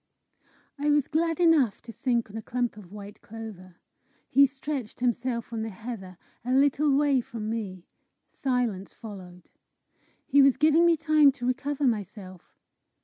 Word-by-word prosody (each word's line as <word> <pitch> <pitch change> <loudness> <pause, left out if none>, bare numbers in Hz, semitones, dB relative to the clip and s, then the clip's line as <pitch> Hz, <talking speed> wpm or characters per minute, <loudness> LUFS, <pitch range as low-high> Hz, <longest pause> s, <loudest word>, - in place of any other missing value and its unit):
I 295 +1 0
was 295 -2 +3
glad 330 +1 0
enough 320 - +4
to 235 - -9
sink 235 -2 -1
on - - -12
a 225 - -4
clump 245 0 -2
of 200 -4 -13
white 205 0 -10
clover. 210 -5 -10 0.6
He 280 +1 +6
stretched 270 -3 -6
himself 240 -1 -1
on 225 - -2
the 225 - -3
heather, 205 -4 -8 0.3
a 250 +2 -1
little 280 +1 +3
way 285 -3 +3
from 225 -2 -6
me. 195 -6 -5 0.4
Silence 245 -7 -2
followed. 185 -5 -11 0.8
He 285 - +5
was 275 -1 +5
giving 315 +3 +4
me 335 -1 +4
time 310 -2 +5
to 245 -2 -7
recover 280 +3 -2
myself. 200 -5 -4
245 Hz, 150 wpm, -27 LUFS, 210-280 Hz, 0.8 s, He